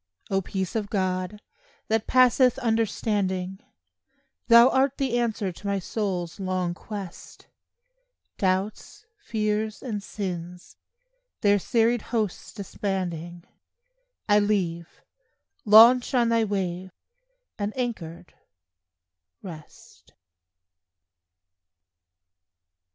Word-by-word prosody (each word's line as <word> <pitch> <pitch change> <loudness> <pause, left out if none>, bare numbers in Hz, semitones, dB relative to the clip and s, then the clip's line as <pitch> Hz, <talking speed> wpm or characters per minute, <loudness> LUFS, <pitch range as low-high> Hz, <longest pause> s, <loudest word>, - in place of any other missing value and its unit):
O 195 0 +2
peace 190 0 -4
of 210 -2 -2
God, 185 +1 -2 0.4
that 220 0 0
passeth 255 0 +4
understanding, 205 -5 -1 0.9
Thou 235 +1 +8
art 270 +1 +1
the 255 -3 0
answer 215 -5 -1
to 200 +4 -9
my 200 0 0
soul's 190 -3 -3
long 185 -2 -1
quest; 195 -1 -9 0.9
Doubts, 195 - -2
fears 215 - -2
and 215 -6 -3
sins, 180 -3 -6 0.7
their 205 0 +4
serried 235 +2 +1
hosts 215 -5 -3
disbanding, 175 -4 -4 0.8
I 205 -1 +5
leave, 180 -5 -2 0.6
launch 235 +5 +7
on 240 -2 +3
thy 230 -1 +2
wave, 190 -2 -3 0.7
and 205 0 -1
anchored, 180 -9 -5 1.1
rest. 160 -5 -13
205 Hz, 85 wpm, -25 LUFS, 185-225 Hz, 1.1 s, Thou